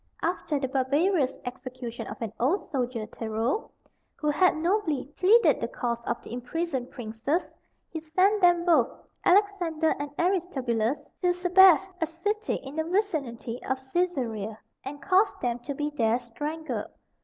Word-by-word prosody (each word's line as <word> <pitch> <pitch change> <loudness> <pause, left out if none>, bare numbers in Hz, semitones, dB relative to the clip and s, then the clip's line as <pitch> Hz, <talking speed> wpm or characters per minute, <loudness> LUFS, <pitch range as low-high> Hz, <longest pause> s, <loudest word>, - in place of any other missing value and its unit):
After 330 -4 -1
the 265 - -1
barbarous 280 +3 +1
execution 250 -1 -6
of - - -7
an 220 - -4
old 345 - 0
soldier, 245 -5 -2
Tero, 225 - -2 0.5
who 300 -1 0
had 350 +2 +3
nobly 335 -4 0
pleaded 430 +6 +5
the - - 0
cause 235 -1 -3
of 235 - -1
the - - -9
imprisoned 260 +1 -3
princes, 245 +7 -2 0.4
he 320 - -5
sent 370 +7 +2
them 350 -1 +5
both 310 -9 +4 0.3
Alexander 355 -5 +3
and 290 0 -3
Aristobulus 275 - 0
to 360 -1 +3
Sebaste, 370 +1 +5
a 325 - +2
city 410 +7 -2
in 275 +3 -8
the 315 - +1
vicinity 310 - -2
of 265 - -1 0.2
Caesarea, 235 - -1 0.3
and 285 +2 -7
caused 390 +2 +3
them 245 -1 -1
to 275 +3 -5
be 295 +1 -2
there 230 -5 +2
strangled. 295 +7 -5
300 Hz, 145 wpm, -27 LUFS, 245-360 Hz, 0.5 s, pleaded